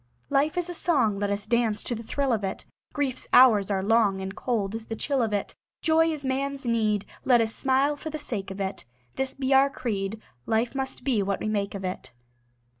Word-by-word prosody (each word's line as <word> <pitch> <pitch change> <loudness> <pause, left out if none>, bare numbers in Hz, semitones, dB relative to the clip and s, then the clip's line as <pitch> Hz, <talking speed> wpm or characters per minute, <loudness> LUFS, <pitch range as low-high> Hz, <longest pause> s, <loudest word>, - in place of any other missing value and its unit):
Life 295 +4 +2
is 355 -1 0
a 350 - -5
song; 265 - +1
Let 205 0 0
us 200 0 -1
dance 230 -2 +1
to - - -2
the 230 - -5
thrill 270 +3 -1
of 215 -3 -1
it. 195 - -4 0.3
Grief's 275 -4 -1
hours 220 -6 +7
are 190 -2 0
long, 210 -2 +3
And 190 0 -5
cold 215 -6 -1
is 225 0 -5
the 225 - -4
chill 275 +2 0
of 225 -2 0
it. 205 -1 -2 0.3
Joy 325 0 +4
is 295 -3 -5
man's 275 +1 -2
need; 215 -3 +1 0.2
Let 245 -2 +5
us 225 -1 0
smile 270 +2 +2
for 315 - -7
the 310 - -4
sake 215 -10 -4
of 195 +1 -7
it. 195 0 -3 0.3
This 265 0 -1
be 270 0 0
our 270 +1 +6
creed: 215 -5 -3 0.3
Life 225 +3 +1
must 265 -2 -3
be 250 -6 +1
what 195 0 -1
we 215 - -2
make 205 -1 -1
of 195 -1 -5
it. 185 -8 -5
230 Hz, 220 wpm, -26 LUFS, 205-270 Hz, 0.3 s, hours